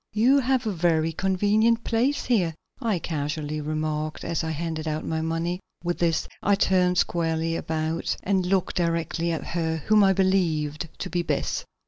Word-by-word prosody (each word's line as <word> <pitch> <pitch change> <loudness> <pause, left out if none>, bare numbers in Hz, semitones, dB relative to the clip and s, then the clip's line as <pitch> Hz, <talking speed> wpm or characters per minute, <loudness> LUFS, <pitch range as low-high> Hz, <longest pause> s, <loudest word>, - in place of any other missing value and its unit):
"You 245 +6 +4
have 260 -1 +1
a 215 - 0
very 165 -3 +1
convenient 205 +6 +2
place 250 +5 +1
here," 185 -10 +1 0.3
I 225 -6 +1
casually 150 -1 -3
remarked, 155 0 -3
as 165 -1 -1
I 160 - -2
handed 160 0 -3
out 155 0 -2
my 160 0 -1
money. 165 +2 -1 0.2
With 175 0 -2
this 165 -2 +1
I 200 - +3
turned 180 -2 +2
squarely 165 -1 0
about 160 0 -2
and 190 -1 +1
looked 190 -1 0
directly 170 0 0
at 165 - -2
her 160 -1 -1
whom 215 -1 +5
I 195 0 +5
believed 165 -5 +1
to 185 - -5
be 175 - +1
Bess. 170 - -2
170 Hz, 165 wpm, -25 LUFS, 160-195 Hz, 0.3 s, whom